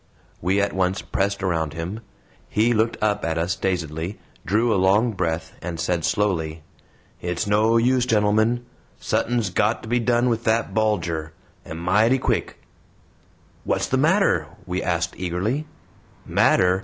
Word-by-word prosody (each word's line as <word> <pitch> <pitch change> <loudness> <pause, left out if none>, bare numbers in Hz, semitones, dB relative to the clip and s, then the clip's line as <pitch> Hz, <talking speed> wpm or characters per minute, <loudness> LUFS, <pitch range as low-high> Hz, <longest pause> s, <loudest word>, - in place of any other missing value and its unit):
We 95 +4 +1
at 100 0 0
once 95 0 0
pressed 100 0 -1
around 80 -5 0
him. 85 +6 -5 0.5
He 115 +4 +2
looked 115 +1 +1
up 105 -1 +1
at 80 0 -1
us 85 +3 0
dazedly, 85 0 -3 0.3
drew 110 +3 +2
a - - +2
long 105 +5 +3
breath, 80 -4 -2
and 85 -1 -5
said 85 0 -1
slowly: 80 -7 -1 0.6
"It's 90 -1 -2
no 110 +3 +3
use, 125 +1 +2
gentlemen! 110 +2 +2 0.3
Suthin's 115 -5 0
GOT 105 +5 +1
to - - -8
be 120 +2 +1
done 120 +1 +2
with 115 -1 0
that 115 +1 +1
Bulger; 85 -8 -1 0.3
and 80 - -7
mighty 105 +9 +3
quick." - - -1 1.1
"What's - - 0
the 130 - 0
matter?" 155 - +3 0.2
we 90 0 -2
asked 85 -1 -1
eagerly. 95 - -2 0.6
"Matter!" 90 +1 +3
100 Hz, 145 wpm, -23 LUFS, 85-115 Hz, 1.1 s, long